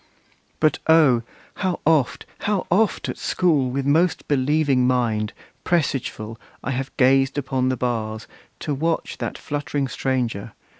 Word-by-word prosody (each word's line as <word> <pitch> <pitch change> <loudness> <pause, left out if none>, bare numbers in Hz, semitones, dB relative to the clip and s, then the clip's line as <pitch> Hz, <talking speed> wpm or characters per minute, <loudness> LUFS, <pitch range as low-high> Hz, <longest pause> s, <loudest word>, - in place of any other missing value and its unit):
But 155 -1 +2
O! 155 -7 +5 0.4
how 185 -3 -1
oft, 155 -5 +2
How 205 -3 0
oft, 205 +3 +2
at - - -5
school, 150 -8 +2
with 135 +2 -2
most 160 +5 +2
believing 140 -2 +2
mind, 115 -4 +1 0.3
Presageful, 120 -9 -1 0.2
have 135 +1 -2
I - - -28
gazed 135 +1 +4
upon 130 -2 0
the 130 - -1
bars, 110 -3 -2 0.4
To 150 - -2
watch 160 +4 -1
that - - -3
fluttering 145 -2 -2
stranger! 120 -6 -2
135 Hz, 135 wpm, -23 LUFS, 125-155 Hz, 0.4 s, O